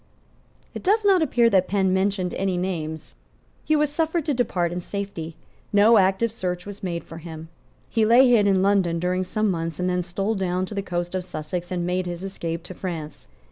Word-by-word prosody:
It - - -6
does 420 +3 +2
not 385 -3 +5
appear 240 -7 +3
that 185 -1 +3
Penn 190 -2 +1
mentioned 190 -1 0
any 190 -1 -1
names. 160 -4 -4 0.5
He 310 - +2
was 300 -1 +2
suffered 320 +1 0
to 295 - +1
depart 180 -9 0
in 180 +1 -3
safety. 175 -5 -5 0.4
No 210 +2 +6
active 195 +4 +2
search 180 -5 -4
was 205 0 -8
made 170 -3 -3
for 165 - -10
him. 160 -1 -9 0.4
He 225 - +1
lay 240 +4 +6
hid 225 -4 +4
in 190 -1 +3
London 190 -4 +2
during 180 +2 0
some 215 +2 0
months, 165 -2 -3
and 180 - 0
then 180 0 +1
stole 195 +5 -2
down 185 -2 -1
to 200 - -8
the 200 - -1
coast 175 -2 -3
of 185 -1 -2
Sussex 175 +1 -5
and 175 -1 -2
made 180 0 -1
his 175 +1 -5
escape 170 -4 -4
to 180 - -8
France. 165 -5 -6
185 Hz, 205 wpm, -24 LUFS, 175-205 Hz, 0.5 s, No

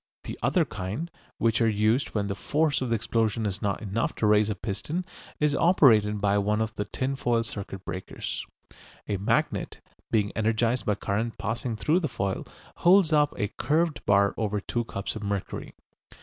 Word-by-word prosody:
The - - -7
other - - +2
kind, 110 - -5 0.3
which 115 +1 +2
are 115 - +4
used 110 +6 +1
when 105 -1 +1
the 100 - -2
force 150 +7 0
of 130 - -1
the 115 - +2
explosion 115 0 0
is 95 -2 -2
not 100 +1 -1
enough 110 +3 -1
to - - 0
raise 105 0 +4
a 105 - -1
piston, 115 - -3 0.3
is 150 -1 +2
operated 115 - +4
by 100 0 +2
one 105 +2 +1
of 110 0 -1
the 105 - -3
tinfoil 120 -1 0
circuit 95 -4 -7
breakers. 95 - -5 0.6
A 100 - -1
magnet, 100 - 0 0.3
being 105 -3 +1
energised 115 +3 +1
by 105 - +3
current 110 +3 -2
passing 115 +2 -2
through 150 - +2
the 165 - -1
foil, 95 -7 -3 0.3
holds 175 -2 +5
up 150 -1 +3
a 105 - -1
curved 155 +4 +1
bar 100 0 +4
over 105 -2 -1
two 120 +4 -2
cups 100 -3 -4
of 110 - -5
mercury. 100 -2 -4
110 Hz, 180 wpm, -27 LUFS, 100-125 Hz, 0.6 s, holds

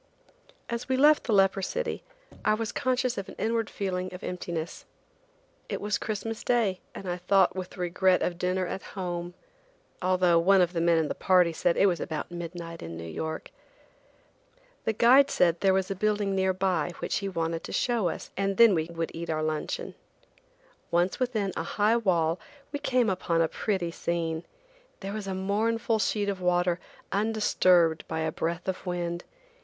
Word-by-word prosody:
As 235 +3 -4
we 260 - +2
left 300 +3 +5
the 235 - -1
leper 195 -1 +4
city - - -2 0.4
I 215 - +3
was 225 0 -3
conscious 255 -2 0
of 195 - -7
an - - -10
inward 225 0 0
feeling 185 -2 -3
of 180 - -10
emptiness. 170 -2 -4 0.9
It - - -2
was 210 0 -1
Christmas 220 +1 -4
day, 220 -7 +1 0.2
and 195 - -7
I 175 0 -2
thought 185 +1 +3
with 185 +1 -6
regret 180 +1 +2
of 175 -1 -2
dinner 185 +1 0
at 190 - -4 0.2
home, 175 -1 -4 0.7
although 180 -2 +3
one 195 +3 +5
of 180 -1 +2
the 165 - 0
men 170 0 +4
in 160 -2 +1
the - - -2
party 180 -3 +3
said 170 +1 +1
it - - +5
was 175 -4 +2
about 155 +3 -4
midnight 170 -1 -7
in 85 0 -7
New 85 - -7
York. 160 - -5 1.3
The 220 - +1
guide 260 +6 +6
said 170 -1 +2
there 195 - +4
was 190 0 +1
a - - -1
building 205 0 0
near 190 0 +2
by 180 -3 0
which - - -2
he 200 -2 -2
wanted 165 -2 -2
to - - -7
show 235 -6 +1
us 160 - -7
and 195 0 -1
then 230 -3 +8
we 160 -3 +1
would 165 0 -4
eat 170 +1 -6
our 155 -1 0
luncheon. 155 -1 -3 1.0
Once 175 +2 +1
within 220 -7 -1
a - - -1 0.2
high 215 +3 +4
wall 175 -6 +1 0.3
we 290 - -3
came 250 -4 +2
upon 180 -3 0
a 165 - +4
pretty 185 -2 -2
scene. 165 -1 -2 0.5
There 195 0 -4
was 210 -2 -5
a 190 - -2
mournful 220 +4 0
sheet 210 -1 0
of 195 -2 -2
water 180 0 +2 0.3
undisturbed 185 -6 +3
by 160 0 -2
a 160 0 0
breath 170 +3 -3
of 190 - -3
wind. 175 -1 -3
185 Hz, 180 wpm, -28 LUFS, 170-210 Hz, 1.3 s, then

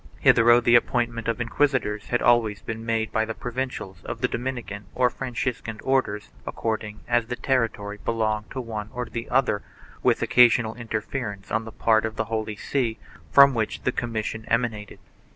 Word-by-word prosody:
Hitherto 120 +1 +6
the 120 0 +3
appointment 120 -1 +2
of 115 +1 -1
inquisitors 120 -4 0
had 120 - 0
always 110 -4 +3
been 115 0 -5
made 115 -1 -1
by 110 - +1
the 110 0 -4
Provincials 125 -5 -5
of - - -5
the - - +3
Dominican 120 -5 -5
or 125 -1 +3
Franciscan 120 -3 -4
Orders 130 -6 0 0.2
according 110 -1 -3
as 120 -1 +2
the 125 - -3
territory 115 -6 -1
belonged 110 -2 -1
to 135 - -5
one 110 -3 -5
or 125 0 -2
to - - -15
the 115 0 -5
other, 125 -5 +2 0.4
with - - +2
occasional 120 -2 +5
interference 110 -2 -5
on 110 +1 0
the 110 - -8
part 110 -1 +2
of 110 0 -3
the 110 - -1
Holy 110 -1 -3
See, 115 0 -1 0.3
from 140 0 +8
which 110 -3 -2
the 125 - +1
commissions 110 -2 -3
emanated. 115 -3 -1
115 Hz, 170 wpm, -25 LUFS, 110-120 Hz, 0.4 s, from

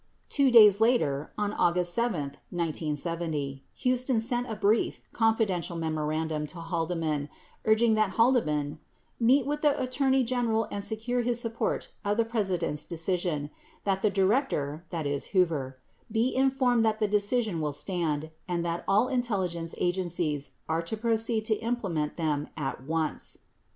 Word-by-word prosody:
Two 280 -2 +3
days 215 -4 +8
later, 155 - +2
on 210 0 -1
August 175 -1 +2
7, 235 -9 0 0.3
1970, 155 -3 -2 0.2
Huston 255 -1 +2
sent 245 +2 -1
a 220 - -3
brief, 210 +2 +1
confidential 220 -7 +1
memorandum 155 -1 -2
to 170 - -9
Haldeman 165 -3 -2 0.4
urging 220 +1 +4
that 215 -2 +2
Haldeman 155 - +2 0.4
"meet 250 +3 +4
with 295 +1 -2
the 295 -1 +3
Attorney 265 +1 +2
General 230 -2 0
and 200 - -3
secure 225 +4 -1
his 240 0 +1
support 230 -1 -2
for 205 0 0
the 230 +1 +2
President's 185 -9 -1
decision, 165 -3 -2 0.3
that 195 -1 0
the 210 - +3
Director 190 - 0 0.5
(Hoover) 155 -9 +1 0.3
be 230 +3 +1
informed 260 -3 +3
that 220 -1 +1
the 215 - +2
decision 205 -2 +1
will 150 -1 -1
stand, 155 -1 -1 0.2
and 175 -1 -1
that 170 0 -2
all 210 +5 +4
intelligence 190 -10 -1
agencies 175 -5 -1 0.2
are 160 +1 0
to 170 +7 -4
proceed 225 0 0
to 220 -1 +2
implement 195 -11 -2
them 150 -3 -1
at 135 -4 -3
once." 160 +3 -2
195 Hz, 140 wpm, -28 LUFS, 160-230 Hz, 0.5 s, days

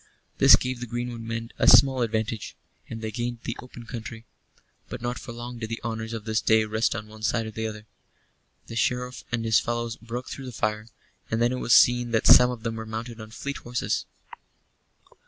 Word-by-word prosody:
This - - +9
gave 125 -1 -3
the 125 - -5
greenwood 120 0 -4
men 115 +1 -5
a - - +3
small 135 -2 +7
advantage, 110 -1 -2 0.3
and 115 -1 -7
they 110 - -3
gained 120 +1 -4
the 115 - -3
open 120 -1 -11
country; 115 -1 -8 0.6
but - - -6
not 120 +1 -3
for 125 - -9
long 120 +1 -7
did 110 -1 -5
the 115 - -4
honors 110 0 -4
of 115 -2 -6
this 110 0 0
day 110 0 +4
rest 110 +2 0
on 105 - -6
one 110 0 -13
side 115 +1 0
or 110 - -6
the 110 +1 -3
other. 105 -1 -8 0.8
The 115 - -9
Sheriff 125 +2 -1
and 115 -1 -1
his 110 0 +4
fellows 120 -1 -3
broke 120 +2 -6
through 135 - -7
the - - -6
fire; 110 -1 -2 0.4
and 110 - 0
then 120 +1 +3
it 130 - -2
was 120 - +2
seen 120 0 +5
that 110 - +2
some 125 0 +8
of 120 -3 -6
them 115 -1 -3
were 110 - -5
mounted 115 +1 -6
on 110 - -9
fleet 140 +5 -5
horses. 120 0 -2
115 Hz, 210 wpm, -26 LUFS, 110-120 Hz, 0.8 s, This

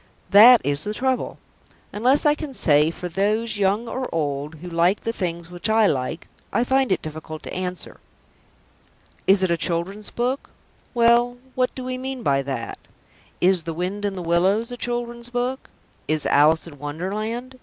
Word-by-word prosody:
That 225 +4 +9
is 145 +1 -1
the 210 +1 -1
trouble. 260 +1 -1 0.6
Unless 255 +8 +2
I 295 - +6
can 300 -3 -7
say, 150 -4 +4
"For 180 +2 -6
those, 210 +5 0
young 205 +4 +1
or 255 +2 -4
old, 145 -1 -2
who 165 +4 -10
like 175 +3 +2
the 230 - -2
things 170 -4 -4
which 175 +4 -2
I 220 0 +4
like," 135 -1 -1 0.2
I 235 - +2
find 265 -1 +1
it 190 - +1
difficult 155 0 -7
to - - -7
answer. 180 -1 -5 1.3
Is 190 0 +5
it 185 - +2
a 170 - +2
children's 185 +5 -2
book? 250 +3 -2 0.5
Well, 240 +1 +4 0.2
what 255 0 0
do 260 - -6
we 255 0 -4
mean 260 -1 -5
by 140 -5 +2
that? 135 -4 -5 0.6
Is 185 0 +4
The 165 0 -5
Wind 185 +4 -3
in 200 -1 -1
the 180 - -5
Willows 190 +8 +1
a - - -4
children's 240 0 -4
book? 250 +2 -3 0.4
Is 155 -1 0
_Alice 155 +3 +4
in 145 -4 -12
Wonderland? 215 - -4
200 Hz, 175 wpm, -23 LUFS, 165-240 Hz, 1.3 s, That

